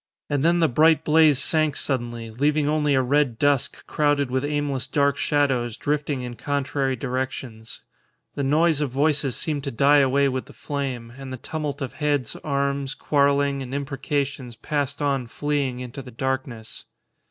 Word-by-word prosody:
And 145 -1 +1
then 170 +1 +3
the 165 - +5
bright 155 +5 +4
blaze 155 -2 +5
sank 155 +1 +2
suddenly, 120 -4 -2
leaving 145 +5 +1
only 150 -2 +2
a 130 - +3
red 135 -2 +1
dusk 145 0 +1
crowded 145 -3 +1
with 130 +1 0
aimless 145 -3 -1
dark 140 -2 +2
shadows 130 -7 0
drifting 145 -2 -1
in 120 -1 -6
contrary 140 0 -1
directions; 125 -3 -5 0.5
the - - -3
noise 150 +2 +3
of 145 - 0
voices 140 -1 +1
seemed 145 0 -2
to - - -1
die 140 +4 +4
away 140 +1 +3
with 130 -1 -2
the - - -15
flame; 130 -5 -4
and 135 -1 -7
the 130 - -5
tumult 150 +1 -4
of 130 - -5
heads, 145 -4 -1
arms, 140 -1 -1
quarrelling, 140 -1 +2
and 130 +1 -5
imprecations 135 -2 -3
passed 145 +2 -2
on 135 -4 0
fleeing 140 -1 -2
into 125 +2 -7
the 130 - -11
darkness. 130 -2 -4
140 Hz, 165 wpm, -24 LUFS, 130-145 Hz, 0.5 s, the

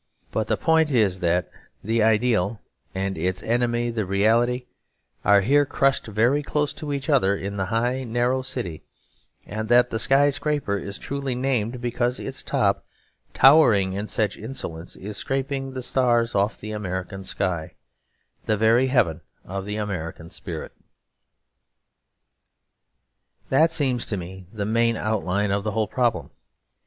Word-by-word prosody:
But - - -1
the - - +1
point 160 -1 +3
is 105 -9 +2
that 90 0 +1 0.4
the 115 +2 +1
ideal 110 -2 +2 0.4
and 95 -2 -2
its 90 +3 -2
enemy 120 0 0
the 115 -2 -1
reality 115 +6 +2 0.6
are 100 +1 +5
here 140 +8 +4
crushed 135 -2 +1
very 115 +7 +2
close 150 0 -1
to 150 -2 -6
each 140 -1 -3
other 125 -10 +3
in 100 +1 -5
the 95 -1 -1
high, 120 +5 0
narrow 120 +2 0
city; 125 - -4 0.6
and 110 +2 -5
that 120 0 +5
the 110 - -1
sky 140 +4 +4
scraper 145 -7 -1
is 100 +1 -7
truly 140 -2 -3
named 125 -2 -1
because 120 +1 -1
its - - -4
top, - - 0 0.5
towering 115 -10 +6
in 100 +2 -3
such 105 -1 -1
insolence, 90 -8 -6
is 105 +2 -5
scraping 135 0 -2
the 130 -1 -5
stars 120 -2 +2
off 100 +1 0
the 110 - -7
American 95 -2 -4
sky, 90 -4 -2 0.7
the 110 - +1
very 115 +4 +4
heaven 100 - +1 0.2
of 95 +1 -5
the 105 +1 -4
American 85 -5 -5
spirit. 85 -3 -6 2.8
That 160 +5 +4
seems 135 -7 0
to 100 - -2
me 90 0 -8
the 105 -2 -3
main 115 +1 +2
outline 105 -2 0
of 100 0 0
the 110 0 -2
whole 110 0 0
problem. 120 +2 0
110 Hz, 145 wpm, -24 LUFS, 100-130 Hz, 2.8 s, towering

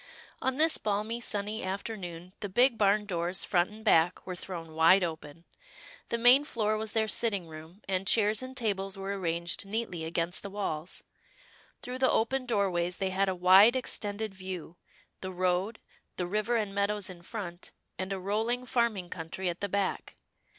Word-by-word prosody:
On 260 0 0
this 315 +1 +5
balmy, 215 +3 -1
sunny 210 -1 -3
afternoon, 185 -3 -5
the 205 - -4
big 245 +5 +4
barn 210 0 +3
doors, 180 -1 -2
front 175 -1 +2
and 215 +1 -13
back, 170 -3 +3
were 185 - -5
thrown 170 -3 -7
wide 165 +4 +6
open. 160 -1 -6 0.6
The 235 - 0
main 245 +4 +7
floor 215 -7 0
was 220 0 -3
their 220 -1 +2
sitting 210 -4 0
room, 160 +5 -12
and 190 0 -1
chairs 215 0 +3
and 260 0 -8
tables 195 -4 -1
were 195 +1 -3
arranged 170 -2 -1
neatly 200 -5 -3
against 170 +2 -1
the 200 - -6
walls. 185 -5 -4 0.8
Through 250 +1 -4
the 260 - +4
open 255 +3 +1
doorways 185 -6 0
they 190 -1 -1
had 195 +1 +1
a 185 - -1
wide 190 +7 +7
ex 255 - 0
tended 205 0 -3
view 185 -3 -7 0.2
— - - -35
the 185 - -4
road, 185 +4 0 0.4
the 180 - -1
river 215 +6 0
and 210 -3 -1
meadows 200 0 0
in 180 -2 -8
front, 180 -3 -7 0.3
and 190 +1 -3
a 195 - -1
rolling 220 +6 -1
farming 230 -8 0
country 175 +2 -4
at 175 - -5
the 200 - -1
back. 200 0 -2
195 Hz, 180 wpm, -30 LUFS, 180-220 Hz, 0.8 s, main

